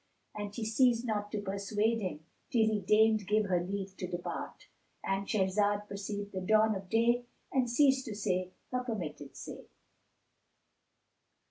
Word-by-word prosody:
And 205 -1 -5
she 225 - -3
ceased 235 +1 +3
not 205 -2 -2
to 210 - -1
persuade 205 +3 0
him, 180 -6 -3 0.3
till 225 -3 +4
he 215 -1 +1
deigned 215 +1 +4
give 210 +1 +3
her 180 -3 +1
leave 195 +1 -4
to 185 - -3
depart.—And 195 +2 -5
Shahrazad 205 +1 +1
perceived 205 0 -5
the 190 - -3
dawn 215 +3 +4
of 190 -2 -6
day 235 +2 +3 0.3
and 255 -2 +2
ceased 265 +1 +4
to 220 - -5
say 185 -3 0 0.2
her 250 0 0
permitted 150 - -5
say. - - -8
205 Hz, 145 wpm, -32 LUFS, 195-225 Hz, 0.3 s, till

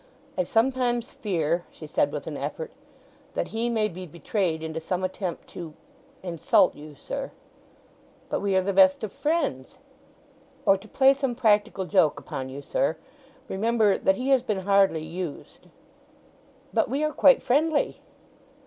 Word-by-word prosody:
"I 185 - 0
sometimes 240 +2 +1
fear," 170 -4 -1
she - - -11
said - - +1
with - - -5
an - - -5
effort, 485 -1 -5 0.6
"that - - -2
he 230 +2 -1
may 220 -2 +1
be 185 -2 -8
betrayed 170 0 -2
into 160 0 -4
some 180 +3 -3
attempt 185 -1 -4
to—insult 185 - -1
you, 150 0 -12
sir." - - -5 1.0
"But - - -1
we 200 -1 0
are 190 - +3
the 200 +1 -1
best 190 +1 +5
of 215 - -3
friends?" 290 - -2 0.9
"Or 195 - +6
to 195 +3 -10
play 270 +4 +5
some 270 -3 -2
practical 210 -4 +2
joke 180 -5 +3
upon 130 0 -6
you, 140 +2 -8
sir. 155 +2 0 0.5
Remember 215 0 +2
that 190 - +2
he 255 +6 -3
has 265 -2 +5
been 210 -6 -2
hardly 195 -4 +3
used." 170 -1 -7 1.1
"But - - +2
we 280 +3 -1
are 305 0 0
quite 275 - +5
friendly?" 295 +4 +1
195 Hz, 150 wpm, -26 LUFS, 175-245 Hz, 1.1 s, Or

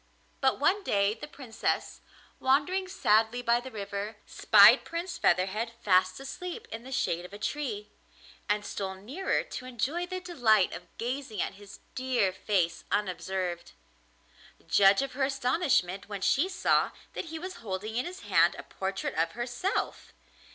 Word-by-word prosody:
But 265 -1 +2
one 365 +9 +2
day 200 - +2
the 220 - -9
Princess, 255 -6 -3 0.4
wandering 300 +9 +2
sadly 225 - +2
by 235 0 +3
the 255 +2 -8
river, 205 -1 -5
spied 215 +4 +7
Prince 340 +1 -5
Featherhead 210 +6 +1
fast 185 0 +3
asleep 360 +10 -6
in 225 - -5
the 260 +2 -11
shade 175 -9 0
of 180 - -11
a - - -6
tree, 215 -3 -3 0.6
and 210 0 +1
stole 190 -1 -4
nearer 275 - -2
to 380 - -7
enjoy 280 +9 -2
the 370 0 -4
delight 245 - +2
of 175 - -8
gazing 245 -2 -4
at - - -1
his 200 0 -13
dear 250 -7 +1
face 180 -4 0
unobserved. 180 -2 -2 0.9
Judge 195 +4 +5
of 275 - -5
her 270 +1 -1
astonishment 250 - 0
when 200 -2 -5
she 300 - +2
saw 370 -1 +2 0.2
that - - -4
he 320 0 -6
was 370 +2 -7
holding 210 +1 -4
in 245 - 0
his 365 +2 -7
hand - - +3
a - - -7
portrait 195 0 -4
of 165 +1 0
herself! 245 - -3
230 Hz, 155 wpm, -29 LUFS, 200-280 Hz, 0.9 s, spied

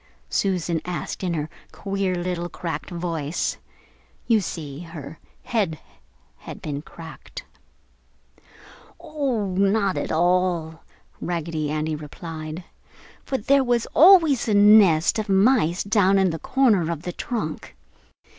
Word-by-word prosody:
Susan 175 -4 0
asked 180 +1 -5
in 175 -2 -1
her 150 -1 -2 0.2
queer 195 -2 -2
little 175 0 -3
cracked 160 -5 -5
voice. 165 -3 -3 0.7
You 230 -2 +3
see, 150 -5 -6
her 165 -3 -9 0.2
head 205 -10 -1 0.6
had - - -10
been 145 -2 -5
cracked. 165 - -11 1.5
"Oh, 260 -9 -2
not 200 0 +1
at - - -3
all," 175 -1 +1 0.4
Raggedy 165 -3 -3
Andy 155 +1 -2
replied, 155 +2 -8 0.6
"for 265 - -2
there 275 +4 +3
was 240 -2 +1
always 325 - +6
a 215 - +2
nest 205 -4 +5
of 215 -1 -4
mice 195 -3 +3
down 200 -2 +3
in 190 -2 +3
the 160 - -5
corner 220 - +2
of 165 -1 -5
the 180 - -5
trunk. 170 - -5
180 Hz, 120 wpm, -23 LUFS, 160-210 Hz, 1.5 s, always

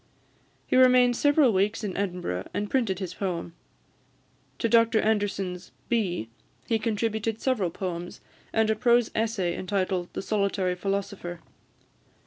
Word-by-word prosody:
He - - 0
remained 250 -1 +6
several 290 -3 +4
weeks 205 +4 +1
in 195 -3 -3
Edinburgh, 180 - -3
and 205 0 -2
printed 230 -8 +1
his 185 -2 -5
poem. 175 -4 -3 1.0
To 230 - 0
Dr 230 0 +4
Anderson's 200 -4 -1 0.2
"Bee" 185 - 0 0.4
he 225 -1 +1
contributed 220 0 -1
several 230 -10 0
poems, 175 0 -5 0.3
and 220 -1 +2
a - - +1
prose 240 0 +3
essay, 215 -6 0
entitled 185 -2 -1
"The - - -4
Solitary 200 -3 0
Philosopher." 190 -2 -4
205 Hz, 125 wpm, -27 LUFS, 185-225 Hz, 1.0 s, remained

